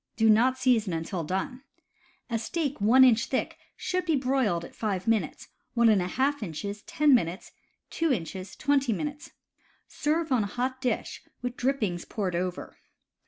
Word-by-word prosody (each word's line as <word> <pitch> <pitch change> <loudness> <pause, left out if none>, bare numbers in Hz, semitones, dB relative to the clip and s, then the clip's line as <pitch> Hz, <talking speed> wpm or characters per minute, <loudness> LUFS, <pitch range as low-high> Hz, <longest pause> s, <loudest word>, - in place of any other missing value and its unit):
Do 220 -1 +5
not 250 +4 +4
season 230 -8 +2
until 165 +2 -3
done. 190 - -3 0.7
A 230 -2 -1
steak 285 +2 -3
1 245 +6 +6
inch 235 -2 +5
thick 260 - -2 0.2
should 365 0 -1
be 330 -3 +1
broiled 255 -10 0
five 200 -2 -3
minutes, 220 -8 0 0.3
Ij 235 +6 +3
inches 200 +4 -5
ten 300 -1 +3
minutes, 185 -3 0 0.4
2 325 -2 0
inches 185 -3 -4
twenty 280 -5 +1
minutes. 295 +6 -5 0.5
Serve 315 +1 -1
on 250 -3 +3
hot 250 +6 -2
dish 250 -2 -2 0.2
with 245 0 -3
drippings 230 -11 -1
poured 190 -5 -3
over. 180 +1 -4
235 Hz, 140 wpm, -27 LUFS, 195-270 Hz, 0.7 s, 1